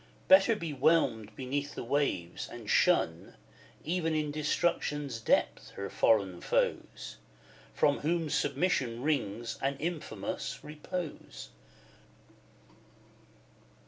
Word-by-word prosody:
Better 195 +4 +7
be 165 -7 -4
whelmed 130 -7 +2
beneath 140 +2 -3
the - - -4
waves, 115 -10 -1
and 120 -3 -9
shun, 85 - +2 0.5
Even 165 -1 0
in 150 -1 0
Destruction's 150 -3 -1
depth, 110 - +1
her 100 0 -5
foreign 100 -5 +2
foes, - - -1 0.6
From 145 - +3
whom 165 +1 0
submission 140 -5 0
wrings 115 -6 -1
an 135 0 0
infamous 165 +1 -4
repose. 155 - -6
145 Hz, 95 wpm, -31 LUFS, 115-160 Hz, 0.6 s, Better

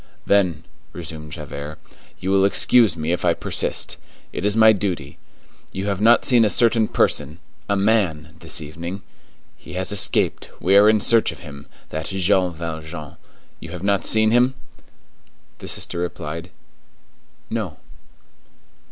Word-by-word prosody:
"Then," 90 -6 +2 0.3
resumed 80 -3 -8
Javert, 75 +1 -7 0.4
"you 95 - -3
will 95 0 +4
excuse 100 -1 +4
me 80 +1 -2
if 90 - -1
I 85 -2 +2
persist; - - -2 0.4
it - - -4
is 105 +2 +1
my 110 -1 +7
duty; 100 -3 -4 0.5
you 95 +1 -5
have 100 -1 -2
not 115 +2 +5
seen 120 -3 +5
a 105 - +3
certain 115 0 +3
person—a 80 +7 -2
man—this 85 -6 -1
evening? 85 +5 -7 0.5
He - - -12
has 95 +2 -1
escaped; 105 -3 +2
we 95 +3 +2
are 105 +1 +7
in 110 -1 +3
search 115 +1 +4
of - - -12
him—that 80 +1 -9
Jean 95 -1 +1
Valjean; 80 -2 -7 0.4
you 85 - -10
have 90 +1 -8
not 100 0 +1
seen 110 0 +4
him?" 125 +3 +3 1.0
The - - -9
sister 85 - -2
replied:— 85 0 -5 1.0
"No." - - -4
90 Hz, 135 wpm, -21 LUFS, 80-105 Hz, 1.0 s, my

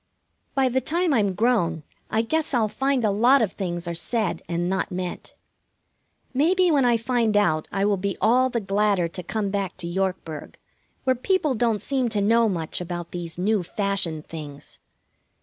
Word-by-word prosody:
By 270 -1 +3
the 260 +1 +1
time 340 +1 +1
I'm 205 -6 +2
grown 190 -9 +1 0.3
I 225 - +1
guess 315 +3 -1
I'll 225 -3 +3
find 265 +2 0
a 210 - +3
lot 240 +7 +5
of 215 -6 +1
things 175 -3 -4
are 170 - -2
said 215 +3 -1
and 175 0 -1
not 190 +2 -1
meant. 180 -1 -5 1.0
Maybe 350 +6 +3
when 280 -4 +3
I 240 -1 +4
find 230 -2 +1
out 155 -7 +2
I 195 +1 0
will 205 -1 +2
be 195 +1 -2
all 255 +4 +4
the 235 -2 -2
gladder 200 -2 +1
to 180 - -6
come 200 +2 -2
back 195 -2 -2
to 180 - -5
Yorkburg, 175 -4 -3 0.5
where 260 -1 +2
people 315 +2 +1
don't 230 -3 0
seem 260 -3 0
to 215 -2 0
know 225 +2 +4
much 170 -3 -3
about 175 -1 -5
these 170 -2 -6
new 205 +3 +1
fashioned 180 -4 -2
things. 150 -3 -9
205 Hz, 180 wpm, -24 LUFS, 180-245 Hz, 1.0 s, lot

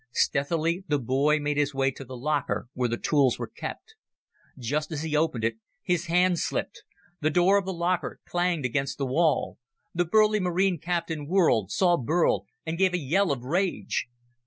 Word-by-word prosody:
Stealthily, 165 +8 0
the 145 - +2
boy 140 +4 +2
made 145 0 -1
his 145 -1 0
way 135 0 +2
to 135 - -10
the 130 -1 -9
locker 140 0 -1
where 125 -1 -1
the 120 - -1
tools 140 -2 +2
were - - -3
kept. 445 - -8 0.6
Just 145 +6 -2
as 155 -1 -3
he 155 -1 -2
opened 150 -7 +1
it, 115 0 0 0.3
his 180 0 0
hand 180 +1 +3
slipped. - - -3 0.4
The 155 - +1
door 180 +5 +4
of 195 - -6
the - - -1
locker 175 +1 -1
clanged 175 -5 0
against 135 +2 -1
the 140 - -1
wall. 155 +4 +1 0.3
The 175 +1 +1
burly 215 +4 +4
Marine 180 -1 +1
captain 165 -3 -3
whirled, 160 - +3
saw 175 - +3
Burl, 140 - +1 0.2
and 165 +1 -3
gave 190 -1 +3
a - - +2
yell 175 +4 +1
of 130 -3 -3
rage. 175 +4 -1
155 Hz, 180 wpm, -26 LUFS, 135-175 Hz, 0.6 s, door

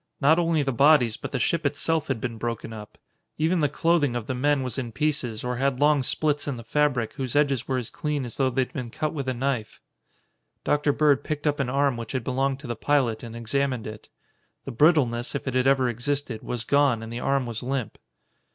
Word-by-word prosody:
Not 155 +4 +4
only 165 -3 +2
the 135 - 0
bodies, 135 -3 +4
but - - -7
the - - -1
ship - - 0
itself 160 -1 0
had 135 -4 -1
been 115 -1 -4
broken 115 -1 -4
up. 105 -1 -10 0.4
Even 165 +3 +1
the 145 -2 +2
clothing 150 -4 +1
of 120 -3 -3
the 130 - -3
men 140 +2 +1
was 125 0 -3
in 120 -3 -4
pieces 135 -5 -1
or 125 0 -2
had 135 0 0
long 145 -1 +4
splits 145 +3 0
in 140 -4 -2
the 115 - -8
fabric 130 -2 0
whose 130 -2 -4
edges 140 -4 +2
were 130 - 0
as 125 -3 -4
clean 150 -3 -2
as 120 - -8
though 135 -1 +1
they 130 +1 +1
had - - -11
been 125 -3 -4
cut 155 +6 -3
with 140 -4 -4
a - - 0
knife. 125 -3 -2 0.8
Dr. 150 0 +2
Bird 145 -1 +3
picked 150 -1 -4
up 145 -1 +1
an 135 -3 0
arm 140 -1 +1
which 115 +1 -6
had 130 -3 -1
belonged 135 +2 0
to - - -11
the 120 - -3
pilot 125 -3 +1
and 115 -1 -8
examined 125 +1 -1
it. 110 0 -9 0.6
The - - -5
brittleness, 125 -4 +2
if 140 - -4
it 130 - -1
had 130 +1 +2
ever 135 -2 +4
existed, 120 0 -2
was 120 -2 -4
gone 135 -3 +2
and 115 +1 -7
the 120 - -4
arm 135 0 +1
was 115 -2 -5
limp. 130 -2 -3
135 Hz, 230 wpm, -25 LUFS, 120-145 Hz, 0.8 s, Not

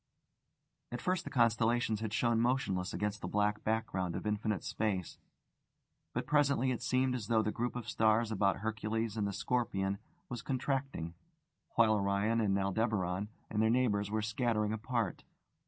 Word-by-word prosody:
At 120 - -3
first 180 +3 -1
the - - -4
constellations 115 -2 +2
had 110 -1 -3
shone 115 0 +2
motionless 115 -7 0
against 105 -1 -2
the - - -3
black 105 0 0
background 110 -5 -1
of - - -4
infinite 105 -1 -1
space; 100 -5 -2 0.9
but - - -2
presently 140 -3 +3
it 120 - -3
seemed 130 +1 +2
as 115 -5 -3
though 110 -1 +3
the 105 - 0
group 120 +3 -2
of 120 -3 -5
stars 110 +1 +2
about 100 -2 +1
Hercules 110 0 -2
and 105 -2 0
the - - -2
Scorpion 100 -2 -1 0.3
was 120 -2 -5
contracting, 135 - -2 0.6
while 115 -2 +5
Orion 100 +3 +1
and 100 -2 +2
Aldebaran 100 -1 0 0.2
and 105 - +1
their 110 - +4
neighbours 110 -4 +2
were 110 0 -1
scattering 110 -1 0
apart. 115 -2 -2
110 Hz, 155 wpm, -33 LUFS, 105-120 Hz, 0.9 s, while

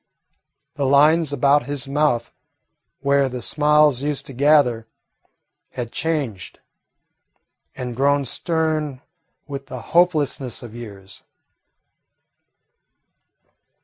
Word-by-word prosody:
The 140 - 0
lines 150 +3 +4
about 145 +1 +2
his 145 -1 -3
mouth 140 -4 0 0.7
where 140 -1 +2
the 125 0 -5
smiles 150 0 +3
used 145 -1 -2
to 135 - -9
gather 130 -4 +3 0.9
had 120 -2 -5
changed 140 - -3 1.2
and 125 -2 -5
grown 140 +2 +2
stern 155 -2 -2 0.4
with 140 -2 -7
the 130 - -7
hopelessness 150 -9 +1
of 115 -2 -10
years. 100 -5 -10
140 Hz, 90 wpm, -21 LUFS, 125-150 Hz, 1.2 s, lines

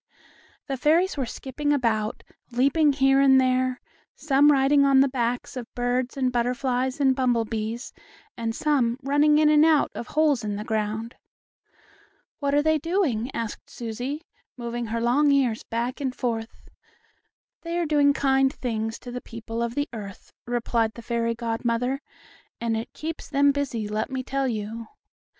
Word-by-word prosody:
The 270 -2 -3
fairies 330 +8 +2
were 270 -4 -2
skipping 290 +5 -3
about, 225 -6 0 0.3
leaping 280 +5 +3
here 270 0 +3
and 265 -1 +6
there, 255 0 +1 0.4
some 290 0 +4
riding 280 +1 +4
on 275 -1 +5
the 275 - +5
backs 245 -2 -2
of 245 -2 -7
birds 245 +1 -1
and 255 -2 +1
butterflies 250 +2 -1
and 265 -2 +3
bumblebees, 230 -2 -1 0.4
and 225 -1 -3
some 255 -6 +1
running 290 +2 +4
in 305 0 +4
and 300 0 +6
out 315 -2 +4
of 240 - -6
holes 295 -6 +2
in 205 -1 -2
the 210 - -4
ground. 220 +1 -2 1.3
"What 280 -1 0
are 290 - +3
they 315 0 +2
doing?" 295 - 0
asked 230 -2 -5
Susie, 245 +7 -5 0.3
moving 235 -1 -4
her 230 +1 -2
long 280 +5 +3
ears 255 -5 +2
back 240 +4 -3
and 260 -2 -2
forth. 225 -3 -4 0.9
"They 335 0 -3
are 345 - 0
doing 290 -2 +4
kind 270 -1 +2
things 225 -5 -3
to 245 - -8
the 250 0 -5
people 230 0 -6
of 235 0 -2
the 285 0 0
earth," 200 -4 -9
replied 235 -2 0
the 235 - -10
fairy 230 0 -1
godmother, 235 +3 -1 0.6
"and 230 -1 -1
it 220 +1 -4
keeps 320 +1 -6
them 285 0 +4
busy, 265 -7 -2
let 215 +3 -2
me 260 -1 -3
tell 275 +1 -1
you." 225 0 -4
255 Hz, 160 wpm, -25 LUFS, 230-280 Hz, 1.3 s, and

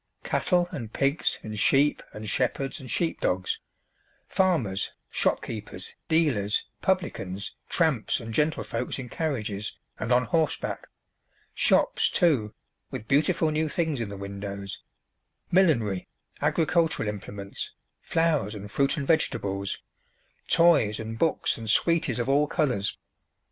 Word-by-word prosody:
Cattle 175 -1 +2
and 115 -6 -5
pigs 140 +5 +1
and 110 -1 -5
sheep 140 +6 +4
and 110 0 -7
shepherds 130 +4 -1
and 130 - -9
sheepdogs; 95 - 0 0.7
farmers, 140 - +1 0.2
shopkeepers, 105 -4 -2 0.2
dealers, 140 -11 +2 0.2
publicans, 100 - -1 0.2
tramps, 155 -10 +1
and 115 -2 -7
gentlefolks 150 +4 0
in 130 -2 -6
carriages 115 - -3 0.2
and 115 - -2
on 125 0 +4
horseback; 160 +3 -1 0.7
shops, - - +3
too, 135 -12 +2 0.4
with 110 - -6
beautiful 155 +3 +3
new 155 +1 0
things 160 -8 0
in 110 - -3
the 100 - -6
windows; 100 0 -6 0.7
millinery, 115 - +3 0.3
agricultural 165 -5 +2
implements, 100 -1 -5 0.3
flowers 155 -10 +1
and 105 0 -8
fruit 140 +6 +2
and 140 - -2
vegetables; 100 - 0 0.6
toys 145 -11 +5
and 115 0 -5
books 165 -6 +1
and 110 -1 -5
sweeties 155 +1 +3
of 120 0 -1
all 145 +2 +4
colours. 130 -11 0
125 Hz, 115 wpm, -27 LUFS, 105-160 Hz, 0.7 s, toys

